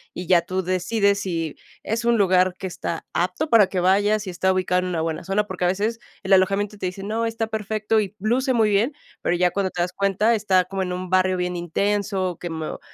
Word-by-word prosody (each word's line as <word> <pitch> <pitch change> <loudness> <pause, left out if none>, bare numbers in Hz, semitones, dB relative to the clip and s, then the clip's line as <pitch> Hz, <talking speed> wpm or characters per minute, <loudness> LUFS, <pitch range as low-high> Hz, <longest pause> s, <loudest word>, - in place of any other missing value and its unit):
y 180 - -5
ya 175 0 +4
tú 185 +2 -3
decides 200 +3 +1
si 165 -5 -3 0.3
es 230 +2 -2
un 235 0 +3
lugar 185 -2 +3
que - - -7
está 175 -2 -4
apto 180 - -1
para 215 -4 +6
que 190 -1 -2
vayas 205 +4 +2
si 185 - -5
está 190 +1 +1
ubicado 185 -1 +1
en - - -3
una 170 -3 -1
buena 160 0 -3
zona. 195 +3 0
Porque 185 -2 -3
a - - +4
veces 210 +5 -1 0.2
el 190 +1 +2
alojamiento 195 +2 +2
te 185 - -2
dice: 190 +2 -6
"No, 225 +3 -1
está 225 0 -2
perfecto 220 0 -1
y 205 -1 -3
luce 255 +6 +1
muy 220 -3 +3
bien", 225 +8 +2 0.3
pero 175 - +1
ya 180 0 +2
cuando 195 -2 -1
te 175 - -3
das 175 - -1
cuenta, 200 +3 +2
está 195 -4 +2
como 195 +1 -4
en 180 - -2
un 185 0 -5
barrio 185 0 +3
bien 180 0 -2
intenso, 190 +1 -1
que 175 - -5
mo 160 -1 -5
190 Hz, 230 wpm, -23 LUFS, 180-210 Hz, 0.3 s, para